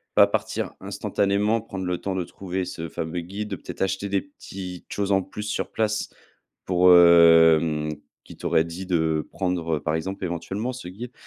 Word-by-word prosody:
pas - - +7
partir - - -2
instantanément, 105 +3 0
prendre 95 -4 -6
le 90 -1 -1
temps 95 -1 -3
de 90 - -1
trouver 95 +1 -4
ce 85 -2 -6
fameux 80 +3 -4
guide, 100 +3 -5
peut-être - - -9
acheter 95 +1 -1
des 100 0 +1
petites 95 -10 -9
choses 100 -1 -1
en 95 - +3
plus 95 +3 -7
sur 105 - -3
place 110 -1 -1 0.6
pour, 90 0 +5
hem 80 -2 +6 0.4
qui - - -13
t'aurait 80 - +2
dit 85 +3 -7
de 80 -3 0
prendre, 85 -4 -1
heu, - - -5
par 80 +3 -1
exemple, 95 +4 -4
éventuellement 95 +7 -3
ce 125 -7 -8
guide. 115 +7 -8
90 Hz, 175 wpm, -24 LUFS, 85-100 Hz, 0.6 s, pas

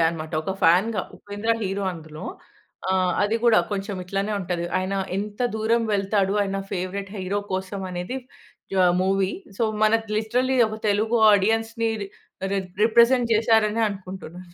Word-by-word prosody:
అనమాట. 160 -1 -5
ఒక 190 - -2
ఫ్యాన్‌‌‌గా 190 +5 +4
ఉపేంద్ర 205 +2 -4
హీరో 195 0 -2
అందులో. 155 -2 -9 0.7
ఆ! - - +3 0.3
అది 215 +3 +1
గూడా 230 -2 +6
కొంచెం 200 0 -3
ఇట్లనే 195 +3 -2
ఉంటది. 175 -2 -2
ఆయన 185 +1 -2 0.2
ఎంత 205 +2 -5 0.2
దూరం 230 +2 +2
వెళ్తాడు 195 0 +1
ఆయన 195 0 -2 0.2
ఫేవరైట్ 190 +1 -3
హీరో 190 +2 -1
కోసం 190 +1 -3
అనేది 180 +8 -4 0.6
యాహ్! 180 -1 +5
మూవీ. 195 0 +1 0.3
సో, - - 0 0.2
మనకు 225 +1 +2
లిటరల్లీ 250 +4 +1
ఒక 215 - -6
తెలుగు 220 +3 +2
ఆడియన్స్‌ని 225 +3 +1
రి 195 - -6 0.4
రి 200 - +1 0.3
రిప్రజెంట్ 235 +1 +4
జేసారనే 220 0 +3
అనుకుంటున్నాను. 185 -3 -8
200 Hz, 140 wpm, -24 LUFS, 185-220 Hz, 0.7 s, గూడా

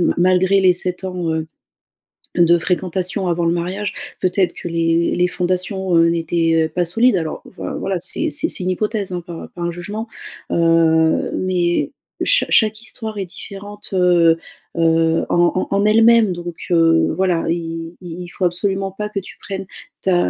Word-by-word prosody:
ma - - +2
malgré 185 +2 +3
les 185 -1 +5
7 180 +1 0
ans, 180 -3 -2
heu, 160 0 -2 0.9
de 175 0 +5
fréquentation 185 +2 -1
avant 170 0 0
le 165 - +2
mariage 185 +4 -3 0.3
peut-être 185 -1 +1
que - - -7
les 165 0 +1
les 180 0 +2
fondations, 185 +1 -1
heu, 165 0 +5
n'étaient, 165 -1 +1
heu, - - -4
pas 175 +1 -1
solides. 230 +7 +3
Alors 160 -3 -4
enfin - - -6
voilà, 195 -1 -1
c'est 315 - -2
c'est 315 +2 0
c'est 190 - +3
une 185 - -1
hypothèse, 210 +1 -2
hein, 180 -1 -3
pas 170 -2 -8
pas 175 - -8
un 170 - -1
jugement, 205 +6 -6 0.4
heu, 165 -1 +3
mais 180 -2 0 0.3
chaque - - +2
chaque 215 0 +3
histoire 220 -3 -4
est 195 - -2
différente, 205 +3 -8
heu, 175 -3 +4 0.4
heu, 165 0 +2
en 175 0 +3
en 185 - -1
en 200 +1 +2
elle-même, 225 -1 +5
donc, 175 -1 -6 0.2
heu, 165 -1 +3
voilà 180 -3 +1
il 165 0 -4
il 175 -1 -7
il 175 - -7
faut 185 - -6
absolument 195 +2 -1
pas 210 +2 -4
que 210 - -3
tu 190 - -12
prennes 195 -1 -6 0.4
ta, 190 -1 +2
180 Hz, 175 wpm, -19 LUFS, 170-195 Hz, 0.9 s, les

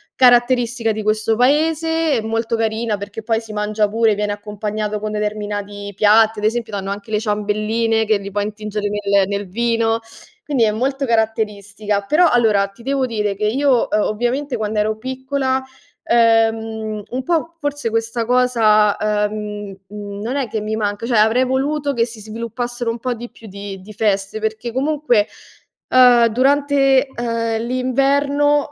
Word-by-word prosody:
caratteristica 245 -2 +3
di 215 0 -4
questo 215 +1 +1
paese 320 +4 +2
e 230 - 0
molto 225 +1 -1
carina 225 0 -1
perché 205 +2 -7
poi 225 0 0
si 225 -1 -11
mangia 210 0 0
pure, 225 0 +2
viene 210 0 -1
accompagnato 210 0 -4
con 215 0 -3
determinati 205 -1 -4
piatti, 215 +2 +4
ad 210 - -2
esempio, 225 0 -1
danno 195 -1 -4
anche 200 +2 -6
le 210 - +1
ciambelline 215 +1 0
che 215 -1 +2
li 200 0 -8
puoi 205 +1 -1
intingere 210 0 -4
nel 200 -1 +1
nel 200 0 -3
vino, 230 +2 +1 0.5
quindi 275 -6 +1
è 215 - +3
molto 270 +5 -1
caratteristica, 215 -3 -1
però, 330 - +4
allora, 220 -6 +3
ti 200 +4 -18
devo 270 +1 0
dire 210 -4 -2
che 210 +2 -2
io, 255 +2 +2
uhm, 210 - +2
ovviamente 245 +5 -1
quando 215 0 -2
ero 215 +1 0
piccola, 260 +2 -2 0.4
ehm, 225 -2 +1
un 255 +2 -3
po' 330 +2 -1
forse 290 -5 -2
questa 230 +1 -1
cosa, 225 -4 +3
ehm, 210 -1 -2
mhmm, 205 0 -7
non 235 +5 -3
è 275 -3 -1
che 220 - -2
mi 215 +1 -3
manca, 205 0 -2
cioè 235 -1 +1
avrei 225 +4 +4
voluto 280 +3 -1
che 230 -3 +1
si 230 -2 -11
sviluppassero 235 +2 -4
un 230 - -2
po' 250 +1 -2
di 240 +1 -8
più 225 - -15
di 200 -1 -8
di 205 +3 -12
feste, 200 -1 -1
perché 220 +2 -3
comunque, 270 -5 +1 0.6
ehm, 245 -2 +6
durante, 275 +2 +3
ehm, 230 -2 -2
l'inverno 280 +4 +1
225 Hz, 165 wpm, -19 LUFS, 210-250 Hz, 0.6 s, ehm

